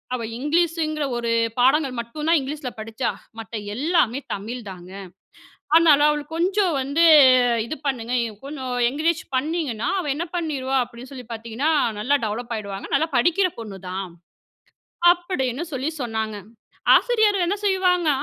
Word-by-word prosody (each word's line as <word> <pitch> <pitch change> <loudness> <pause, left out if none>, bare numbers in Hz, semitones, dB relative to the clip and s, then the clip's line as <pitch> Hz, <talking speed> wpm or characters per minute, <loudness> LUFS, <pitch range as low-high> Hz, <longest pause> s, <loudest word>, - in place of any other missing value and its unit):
அவ 235 - -4 0.2
இங்கிலீஷங்கிற 310 0 0
ஒரு 235 -1 -2 0.3
பாடங்கள் 270 +1 +3
மட்டும்தான் 300 +7 0
இங்கிலீஷ்ல 275 0 -5
படிச்சா. 225 +3 -3 0.3
மத்த 225 +1 -8 0.2
எல்லாமே 275 -3 +1
தமிழ் 225 +5 -5
தாங்க. 180 -1 -11 0.8
அதனால 325 -3 +6
அவளுக்கு 300 +2 -4
கொஞ்சம் 365 -1 +1
வந்து 285 +5 +2 0.6
இது 310 - -5
பண்ணுங்க. 245 -2 -2 0.3
கொஞ்சம் 270 -3 -5 0.2
என்கரேஜ் 320 +4 0
பண்ணிங்கன்னா, 285 -5 -2
அவ 320 - -4
என்ன 335 +5 -3
பண்ணிருவா 275 -6 -2
அப்டின்னு 245 +2 -12
சொல்லி 250 -3 -9
பாத்தீங்கன்னா, 230 +7 -2 0.3
நல்லா 280 +7 +2
டெவலப் 235 +2 -4
ஆயிடுவாங்க. 200 -2 -6
நல்லா 315 +4 +2
படிக்கிற 350 +9 +3
பொண்ணுதான், 190 -3 -6 1.0
அப்டின்னு 340 -6 -3
சொல்லி 270 +3 -2
சொன்னாங்க. 220 -2 -3 0.6
ஆசிரியர்கள் 420 -7 +2
என்ன 400 +4 0
செய்வாங்க? 365 -3 +2
275 Hz, 125 wpm, -23 LUFS, 235-330 Hz, 1.0 s, அதனால